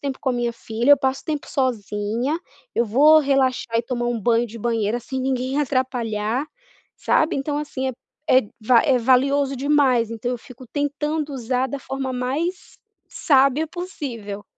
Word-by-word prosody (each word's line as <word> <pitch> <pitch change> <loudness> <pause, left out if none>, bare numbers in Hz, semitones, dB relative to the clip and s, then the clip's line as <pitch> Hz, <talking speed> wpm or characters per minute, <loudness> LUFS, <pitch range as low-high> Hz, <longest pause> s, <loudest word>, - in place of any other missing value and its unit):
tempo 275 -2 -4
com 265 - -1
a - - +2
minha 240 -1 -1
filha, 230 +3 -1
eu 285 - +8
passo 265 -1 -1
tempo 300 -3 -3
sozinha, 235 +2 -1 0.4
eu 235 - +2
vou 295 +8 +6
relaxar 260 -4 +1
e - - 0
tomar 240 0 -3
um 240 -2 -1
banho 235 +1 +2
de 230 +1 -10
banheira 230 0 0
sem 265 +2 -5
ninguém 260 +1 -1
atrapalhar", 245 -3 -1 0.5
sabe. 315 +1 +1
Então, 290 +2 -2
assim, 265 -3 -3
é 260 - -3 0.4
é 255 - +6 0.2
va 230 +2 +5
é 270 -5 +3
valioso 270 +3 +2
demais. 265 -4 +2
Então, 235 +2 -3
eu 245 - -4
fico 255 +1 -13
tentando 290 +2 -2
usar 255 +1 -1
da 280 - -4
forma 265 0 -4
mais 285 +9 -3 0.3
sábia 275 +1 +2
possível. 235 - -6
260 Hz, 165 wpm, -22 LUFS, 235-280 Hz, 0.5 s, eu